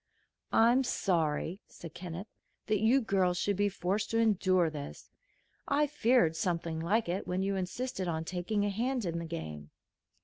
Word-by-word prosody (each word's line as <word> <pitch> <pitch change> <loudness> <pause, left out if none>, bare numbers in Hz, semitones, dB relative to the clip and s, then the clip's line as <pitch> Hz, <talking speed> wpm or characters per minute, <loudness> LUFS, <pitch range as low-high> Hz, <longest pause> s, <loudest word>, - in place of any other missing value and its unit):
"I'm 240 +4 +5
sorry," 170 - 0
said 165 -3 -11
Kenneth, 180 +1 -6 0.4
"that 215 -1 +1
you 240 +5 +4
girls 190 -5 +1
should 200 +3 0
be 205 +1 +2
forced 195 +3 -2
to 225 - 0
endure 190 -5 +3
this. 150 -2 -7 0.6
I 290 +1 +3
feared 245 - +3
something 165 -1 -1
like 205 +7 +1
it 180 +3 -2
when 185 +1 -1
you 195 0 0
insisted 190 +2 -3
on 160 -1 -2
taking 185 +4 -1
a - - +1
hand 240 +3 -1
in 170 -1 -2
the 170 - -5
game." 75 - -6
190 Hz, 165 wpm, -31 LUFS, 170-220 Hz, 0.6 s, I'm